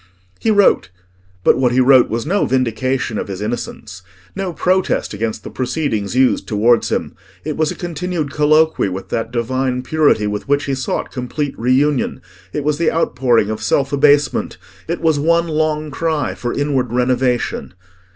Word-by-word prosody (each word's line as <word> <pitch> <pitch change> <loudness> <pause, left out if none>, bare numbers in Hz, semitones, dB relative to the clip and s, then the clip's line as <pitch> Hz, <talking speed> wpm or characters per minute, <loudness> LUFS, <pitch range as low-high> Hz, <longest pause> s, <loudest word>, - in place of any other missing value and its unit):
He 225 - 0
wrote; 205 - +3 0.5
but - - +4
what 125 -2 +2
he 130 - +3
wrote 130 -1 +5
was 115 +1 -2
no 195 +6 +1
vindication 130 -2 -1
of - - -4
his 95 -2 -6
innocence, 105 -3 -5 0.3
no 195 -2 -3
protest 185 -3 0
against 110 +1 -3
the - - -8
proceedings 125 -6 -2
used 130 0 +2
towards 115 +2 +2
him: - - -2 0.3
it 155 -1 -3
was 155 -1 +1
a - - -4
continued 175 -3 -3
colloquy 155 -4 +3
with 95 +1 -6
that 115 0 -2
divine 125 +1 -1
purity 150 -8 +2
with 105 +3 -3
which 145 +1 +2
he 140 - -2
sought 130 0 -3
complete 135 +2 -3
reunion; 130 +4 +1 0.3
it 150 - -3
was 150 +1 0
the 170 - +2
outpouring 120 -9 +1
of 110 - -4
self 140 0 0
abasement; 145 -1 +2 0.3
it 170 +2 -3
was 160 -3 +2
one 170 +3 +2
long 155 -1 -1
cry 160 +1 -1
for 120 - -4
inward 135 -4 -1
renovation. 125 -5 0
135 Hz, 165 wpm, -18 LUFS, 120-155 Hz, 0.5 s, wrote